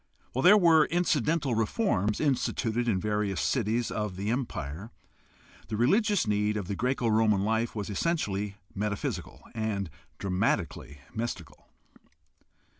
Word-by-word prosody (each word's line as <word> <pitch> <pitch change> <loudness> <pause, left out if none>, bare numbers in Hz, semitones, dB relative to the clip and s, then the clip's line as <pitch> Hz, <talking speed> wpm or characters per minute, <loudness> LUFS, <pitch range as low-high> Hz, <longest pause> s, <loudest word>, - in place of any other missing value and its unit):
While 130 - 0
there 195 +7 +8
were 165 -5 +6
incidental 155 -5 +1
reforms 110 - 0
instituted 120 -4 0
in 100 -5 +2
various 105 -2 -1
cities 115 -1 0
of 105 -3 -3
the 100 +4 -2
Empire, 110 - -4 0.8
the 110 - -3
religious 205 - +3
need 105 0 +1
of 100 -4 -4
the 100 - -2
Greco 125 +2 0
Roman 110 -3 +3
life 110 +2 0
was 105 -2 -3
essen 165 - 0
tially 100 -5 -3 0.2
metaphysical 105 0 -3
and 105 -5 -2 0.3
dramatically 90 -7 -1
mystical. 110 -8 -5
110 Hz, 125 wpm, -28 LUFS, 100-130 Hz, 0.8 s, there